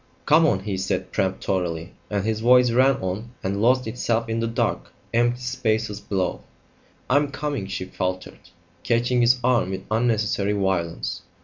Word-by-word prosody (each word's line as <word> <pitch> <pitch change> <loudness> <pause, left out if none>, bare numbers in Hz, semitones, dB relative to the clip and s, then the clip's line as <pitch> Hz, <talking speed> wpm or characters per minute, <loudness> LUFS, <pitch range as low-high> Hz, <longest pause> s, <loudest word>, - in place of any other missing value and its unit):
"Come 160 +2 +5
on!" 95 -9 +1
he 100 -1 -3
said 95 +1 -2
peremptorily, 95 -3 -2 0.2
and 100 -1 -1
his 110 -1 0
voice 125 +1 +5
ran 130 +3 +4
on 105 +6 -4
and 100 +1 -1
lost 125 +3 +3
itself 115 0 -1
in 115 0 -1
the 115 - 0
dark, 115 - -1 0.2
empty 120 +1 +2
spaces 110 -4 -1
below. 95 -3 -2 0.7
"I'm 145 +2 +3
coming," 140 -7 -3
she 95 -1 -4
faltered, 95 0 -4 0.4
catching 120 +1 +1
his 120 +1 +4
arm 120 -6 +2
with 95 0 -5
unnecessary 110 -3 +1
violence. 95 -4 -1
110 Hz, 150 wpm, -24 LUFS, 95-125 Hz, 0.7 s, Come